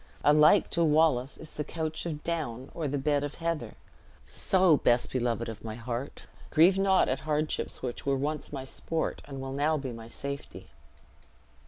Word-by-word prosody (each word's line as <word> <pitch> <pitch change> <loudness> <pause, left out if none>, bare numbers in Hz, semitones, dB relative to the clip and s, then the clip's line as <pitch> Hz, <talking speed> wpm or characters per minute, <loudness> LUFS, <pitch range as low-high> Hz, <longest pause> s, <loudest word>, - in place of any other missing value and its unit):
Alike 150 +6 +5
to 170 - +2
Wallace 150 -4 +3
is 155 - -9
the 150 - -3
couch 160 +2 -4
of 150 -2 -5
down 140 -7 -3
or 160 -3 -2
the 145 +1 -1
bed 145 +1 +1
of 145 0 -4
heather; 165 -2 -3 0.5
so, 185 -5 +4
best 120 -2 +2
beloved 120 -2 -1
of 110 -1 -7
my 110 -1 -5
heart, 120 +3 -5 0.3
grieve 180 +5 +5
not 195 -1 +4
at 130 - 0
hardships 150 -2 -2
which 125 -2 -4
were 140 -1 +1
once 150 +3 -3
my 135 -2 -5
sport, 160 +4 -3
and 135 -2 -7
will 135 0 -5
now 150 +3 +1
be 135 -3 -4
my 115 -1 -9
safety." 140 +4 -7
145 Hz, 175 wpm, -29 LUFS, 130-160 Hz, 0.5 s, Alike